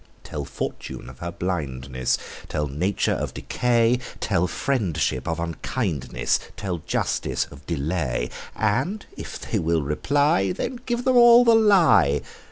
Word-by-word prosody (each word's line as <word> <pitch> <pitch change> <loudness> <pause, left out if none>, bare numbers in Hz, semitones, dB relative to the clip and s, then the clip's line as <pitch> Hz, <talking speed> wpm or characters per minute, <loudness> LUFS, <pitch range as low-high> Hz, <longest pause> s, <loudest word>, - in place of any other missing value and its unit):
Tell 75 -2 -5
fortune 65 -2 -6
of 65 - -17
her 85 0 -4
blindness; 70 -8 -2 0.3
Tell 75 - -1
nature 90 +8 0
of - - -3
decay; 120 0 +2 0.2
Tell 90 +2 +1
friendship 90 - -1
of 80 0 -1
unkindness; 85 - -1 0.2
Tell 90 -4 -3
justice - - -1
of 70 0 -14
delay: 70 -6 -1 0.2
And 130 - 0
if - - -7
they - - -2
will 80 -1 +1
reply, 95 - +2
Then 245 - -4
give 240 0 -1
them 255 -1 +4
all 240 0 +8
the 230 - +6
lie. 190 - +5
90 Hz, 135 wpm, -24 LUFS, -, 0.3 s, all